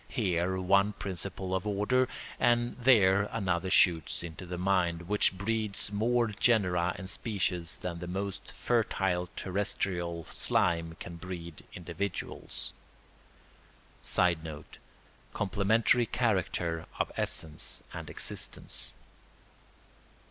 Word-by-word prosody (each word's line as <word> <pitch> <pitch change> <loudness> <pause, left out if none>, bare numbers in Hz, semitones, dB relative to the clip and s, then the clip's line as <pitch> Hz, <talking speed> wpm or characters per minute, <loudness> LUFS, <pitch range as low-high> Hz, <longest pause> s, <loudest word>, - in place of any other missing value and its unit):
Here 95 -5 0
one 100 +3 +4
principle 95 -1 -4
of 95 +2 -1
order 105 +6 +2 0.3
and 120 0 +3
there 105 -6 +5
another 95 -4 0
shoots 85 -4 +4
into 85 +2 -7
the 90 0 -4
mind, 90 -2 +1
which 100 0 +2
breeds 105 0 -1
more 115 +3 +2
genera 90 -5 +2
and 95 - -7
species 90 -5 -1
than 85 -2 -4
the 90 - -5
most 95 +2 -4
fertile 95 -6 +1
terrestrial 90 -3 -1
slime 85 +1 0
can 85 -1 -7
breed 85 -2 -7
individuals. 90 +2 -4 1.3
[Sidenote: 80 -4 0 0.5
Complementary 110 +5 +3
character 90 -7 0
of - - 0
essence 80 -1 -2
and - - -6
existence. - - -3
95 Hz, 100 wpm, -31 LUFS, 85-105 Hz, 1.3 s, there